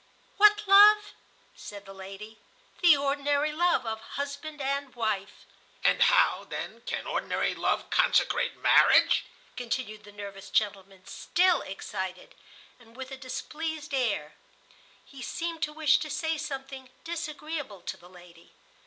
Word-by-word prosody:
"What 420 0 +6
love?" 415 +1 +7 0.4
said 205 -1 -10
the 195 - -11
lady. 195 +3 -10 0.4
"The 340 -5 +7
ordinary 285 +1 0
love 345 -2 +1
of 220 0 -4
husband 285 +5 -6
and 275 -1 -3
wife." 215 -4 -3 0.4
"And - - +3
how, - - +4
then, - - -7
can - - -3
ordinary - - -1
love - - -1
consecrate - - +2
marriage?" - - +5 0.3
continued 230 -3 -4
the 205 - -13
nervous 200 -1 -9
gentleman, 195 -3 -2
still 360 0 +1
excited, 190 -1 -6 0.5
and 230 -1 -20
with 265 0 -7
a - - -5
displeased 300 +3 -6
air. 220 - -1 0.7
He 275 -1 -13
seemed 330 +5 -4
to 300 - -1
wish 305 -1 +3
to 310 - -5
say 320 +2 -1
something 270 -4 -7
disagreeable 305 - -5
to - - -5
the 175 - -17
lady. 175 -2 -17
270 Hz, 135 wpm, -28 LUFS, 205-315 Hz, 0.7 s, love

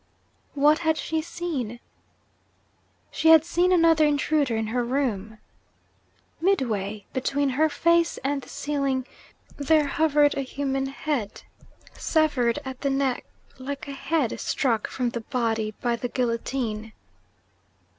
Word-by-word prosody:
What 295 +2 +4
had 320 -1 +1
she 320 0 -2
seen? 310 -9 -4 1.3
She 320 - +2
had 320 -1 +8
seen 350 +2 +2
another 330 -3 +5
intruder 290 -3 +2
in 220 - -1
her 240 +3 -1
room. 230 -5 -2 1.0
Midway 215 - 0
between 275 +2 0
her 305 +5 +2
face 335 +2 +2
and 275 +1 -1
the - - -14
ceiling, 275 -3 -1 0.5
there 300 +1 +3
hovered 295 0 +3
a 275 - -1
human 270 0 -2
head 270 -6 -3 0.5
severed 290 -7 +1
at 260 -1 -7
the 280 - 0
neck, 270 -2 0 0.3
like 275 +2 -6
a - - -5
head 275 -2 -1
struck 230 -5 0
from 250 -2 -2
the 235 - -4
body 225 -3 -1
by 240 -1 +2
the 245 +1 -4
guillotine. 230 -3 -2
275 Hz, 125 wpm, -25 LUFS, 240-310 Hz, 1.3 s, had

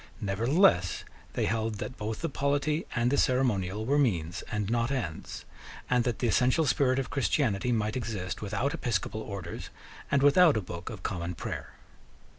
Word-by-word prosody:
Nevertheless 100 - +2 0.3
they - - 0
held 110 +2 -1
that 125 +5 -5
both 110 -1 -4
the 165 - 0
polity 145 +2 0
and 120 +1 +2
the 140 - +2
ceremonial 110 -6 +1
were 140 +4 +2
means 90 - 0
and 105 -2 -1
not 115 +2 +1
ends, 115 - -4 0.5
and 125 -1 +4
that 120 -3 0
the 120 - 0
essential 130 +7 +3
spirit 130 -3 +2
of 135 - -2
Christianity 125 -2 +1
might 110 -2 0
exist 105 -7 -3
without 105 +8 -1
episcopal 110 - -2
orders 100 -6 -6 0.4
and 140 -1 +2
without 150 0 +6
a - - +2
Book 90 -1 -7
of 105 -6 -8
Common 90 -3 -3
Prayer. - - -6
115 Hz, 165 wpm, -29 LUFS, 100-135 Hz, 0.5 s, without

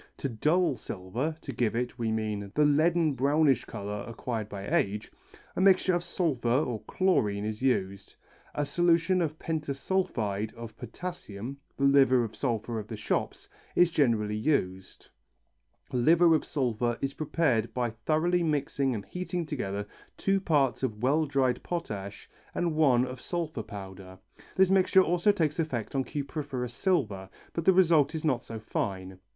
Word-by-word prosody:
To - - -2
dull 150 +6 +1
silver 110 +10 -4
to 135 - -6
give 115 -2 0
it, 125 +1 -3
we 115 -1 0
mean, 105 -2 -2
the 150 - +4
leaden 155 +2 +3
brownish 140 -1 +2
colour 100 +1 -5
acquired 115 -2 -4
by 100 0 -6
age 105 +2 0 0.4
a - - 0
mixture 190 -1 +5
with 175 - +1
sulphur 145 -12 -1
or 125 -3 +1
chlorine 105 - +1
is 110 +1 -4
used. 100 -7 -1 0.4
A 145 - 0
solution 175 +3 +2
of 155 -2 -2
pentasulphide 140 - -2
of 115 -2 -9
potassium 125 - -7 0.2
the 140 - -2
liver 135 -3 +5
of 110 -2 -6
sulphur 115 -3 -2
of 105 - -7
the 110 - -6
shops 105 - -2 0.3
is 175 -1 +5
generally 115 -9 +1
used. 95 -7 -2 0.8
Liver 165 +7 +5
of 155 - +1
sulphur 120 -4 -1
is 135 0 -2
prepared 140 -7 0
by 120 -2 -1
thoroughly 155 +10 +1
mixing 140 -4 0
and 100 - -5
heating 180 -1 -4
together 100 -9 -3 0.3
two 195 0 +1
parts 140 - +2
of 110 -4 -3
well 150 +4 +2
dried 130 -3 +1
potash 100 - -5 0.3
and 170 -2 0
one 130 -6 +4
of 130 0 -8
sulphur 165 -8 -3
powder. 95 -3 -9 0.4
This 190 0 +4
mixture 190 0 +5
also 175 +4 +3
takes 160 -5 -1
effect 130 -9 -2
on 135 -1 0
cupriferous 140 -4 -4
silver, 110 - 0 0.2
but 165 - -3
the - - +7
result 165 -5 +4
is 160 - -3
not 130 -6 +1
so 115 -1 -7
fine. 95 -4 -4
130 Hz, 155 wpm, -29 LUFS, 110-160 Hz, 0.8 s, the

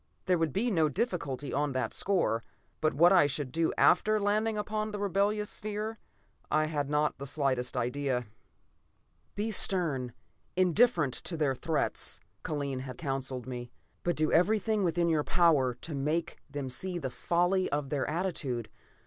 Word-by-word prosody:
There 180 -2 +2
would 165 -2 +1
be 230 - 0
no 160 -5 +3
difficulty 145 - -2
on 145 -1 0
that 130 -4 -1
score. 175 - +1 0.4
But 155 -2 +1
what 170 +6 +6
I 175 -6 +6
should 140 -2 -3
do 165 +3 +1
after 215 0 +4
landing 210 +2 +1
upon 215 +1 -2
the 210 - -4
rebellious 205 +1 0
sphere, 215 +1 -4 0.5
I 155 0 +3
had 145 -3 -2
not 150 -1 +1
the 140 - -5
slightest 130 -3 0
idea. 125 0 -1 1.1
"Be 215 +2 -1
stern, 155 - +1 0.4
indifferent 180 - +3
to 170 - -2
their 145 -3 +2
threats," 155 +2 -1 0.2
Kellen, 140 -4 -2
had 130 0 -7
counseled 135 -5 -3
me, 120 -1 -6 0.3
"but 175 -1 0
do 155 0 +1
everything 210 +4 +3
within 170 -1 +1
your 155 -3 +2
power 150 -9 +3
to 155 +6 -7
make 150 +4 -1
them 140 -1 -4
see 175 +8 -3
the 135 -6 -4
folly 175 +5 +1
of 145 -2 -2
their 140 -2 0
attitude. 150 - -2
155 Hz, 155 wpm, -30 LUFS, 135-190 Hz, 1.1 s, what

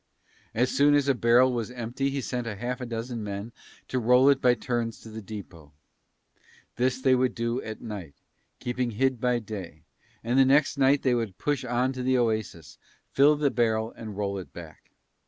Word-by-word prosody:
As 125 +3 +2
soon 145 +1 +4
as 145 -1 +2
a 140 - +4
barrel 120 +1 +4
was 120 -2 -2
empty 125 +2 -3
he 140 0 -3
sent 125 -1 -4
half 120 +4 -4
a 125 - -4
dozen 115 0 -4
men 100 +2 -5 0.4
to 130 - -1
roll 125 +3 +5
it 140 -1 +3
by 125 -1 +4
turns 120 -1 -3
to 110 - -11
the 110 +1 -7
depot. 90 -8 -10 1.0
This 125 +1 0
they 130 0 +3
would 130 0 +1
do 115 +2 -1
at 110 -1 -7
night, 100 - -7 0.4
keeping 125 0 -2
hid 130 +2 0
by 125 -1 +2
day, 95 -9 -8 0.4
and 125 +3 +4
next 140 +2 +3
night 140 0 +3
they 130 - +3
would 115 -6 -2
push 145 -3 -1
on 125 +2 0
to 130 - -5
the 130 0 +2
oasis, 110 -10 -2 0.3
fill 145 +2 +5
the 145 -2 +1
barrel 110 -1 0
and 110 -3 -9
roll 100 -1 -2
it 90 - -10
back. 80 -3 -12
120 Hz, 190 wpm, -27 LUFS, 110-130 Hz, 1.0 s, roll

